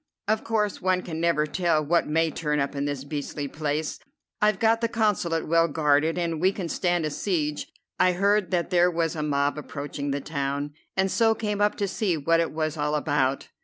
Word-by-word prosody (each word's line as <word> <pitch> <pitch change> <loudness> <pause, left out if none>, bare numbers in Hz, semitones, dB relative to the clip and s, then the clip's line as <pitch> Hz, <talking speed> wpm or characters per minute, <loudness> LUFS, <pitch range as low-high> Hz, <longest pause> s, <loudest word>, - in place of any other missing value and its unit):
Of 215 +1 +1
course, 210 -3 -1
one 185 0 +1
can 160 -2 -5
never 170 -3 +2
tell 155 0 +1
what 170 +3 +2
may 160 +1 +1
turn 150 -1 -1
up 140 0 -1
in 140 0 -1
this 145 -2 -3
beastly 145 0 -4
place. 150 +1 -3 0.4
I've 210 -1 +3
got 225 +3 +2
the 230 - +2
Consulate 205 -8 0
well 165 +1 +4
guarded, 150 +1 +2
and 165 -2 -1
we 185 +1 +4
can 185 -4 -5
stand 175 -2 0
a 155 - -2
siege. 150 -4 -2 0.3
I 180 - +4
heard 200 +1 +2
that 175 -1 -1
there 175 0 +4
was 165 -2 -1
a 155 - -3
mob 145 0 0
approaching 145 -1 -5
the 140 +1 -1
town, 140 0 -3 0.2
and 190 0 +2
so 225 -1 +3
came 210 -2 -2
up 205 0 +3
to 200 - -1
see 190 -3 0
what 165 +3 +2
it 165 - 0
was 155 0 -2
all 150 0 0
about. 145 -3 0
165 Hz, 205 wpm, -26 LUFS, 150-185 Hz, 0.4 s, well